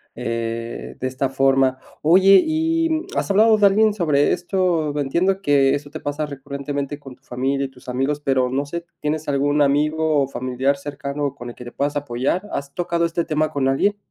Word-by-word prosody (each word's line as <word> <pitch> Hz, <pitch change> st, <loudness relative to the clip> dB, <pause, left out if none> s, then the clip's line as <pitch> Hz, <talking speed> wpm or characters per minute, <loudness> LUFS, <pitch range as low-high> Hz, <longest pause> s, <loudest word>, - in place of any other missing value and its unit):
eh, 115 Hz, 0 st, -4 dB
de 130 Hz, -, -2 dB
esta 130 Hz, +1 st, -1 dB
forma, 135 Hz, 0 st, +2 dB, 0.2 s
oye, 190 Hz, +4 st, +6 dB
¿y 320 Hz, 0 st, 0 dB, 0.2 s
has -, -, -1 dB
hablado 215 Hz, +2 st, +5 dB
de 205 Hz, -, +4 dB
alguien 215 Hz, +2 st, +3 dB
sobre 150 Hz, -7 st, +2 dB
esto?, 175 Hz, -5 st, 0 dB
entiendo 180 Hz, +8 st, +1 dB
que 140 Hz, -4 st, +3 dB
eso 145 Hz, 0 st, -6 dB
te 155 Hz, +1 st, -7 dB
pasa 145 Hz, +1 st, -3 dB
recurrentemente 140 Hz, 0 st, -5 dB
con 135 Hz, -3 st, -11 dB
tu -, -, -41 dB
familia 135 Hz, +2 st, -1 dB
y -, -, -6 dB
tus 130 Hz, 0 st, -14 dB
amigos, 135 Hz, +4 st, -1 dB
pero, 130 Hz, -3 st, +1 dB
no 140 Hz, +2 st, -1 dB
sé, 170 Hz, +3 st, -6 dB, 0.2 s
¿tienes 150 Hz, +1 st, -2 dB
algún 145 Hz, +1 st, +1 dB
amigo, 150 Hz, +1 st, +2 dB
o -, -, -2 dB
familiar 130 Hz, +2 st, -1 dB
cercano 140 Hz, 0 st, -4 dB
con 120 Hz, -3 st, -8 dB
el -, -, -10 dB
que 125 Hz, -, -11 dB
te 120 Hz, -, -9 dB
puedas 145 Hz, +1 st, -1 dB
apoyar?, 145 Hz, +8 st, -2 dB
¿has 140 Hz, 0 st, -4 dB
tocado 170 Hz, -1 st, -1 dB
este 170 Hz, 0 st, -1 dB
tema 155 Hz, -1 st, 0 dB
con 140 Hz, -2 st, 0 dB
alguien? 200 Hz, +10 st, +1 dB
145 Hz, 190 wpm, -21 LUFS, 135-170 Hz, 0.2 s, oye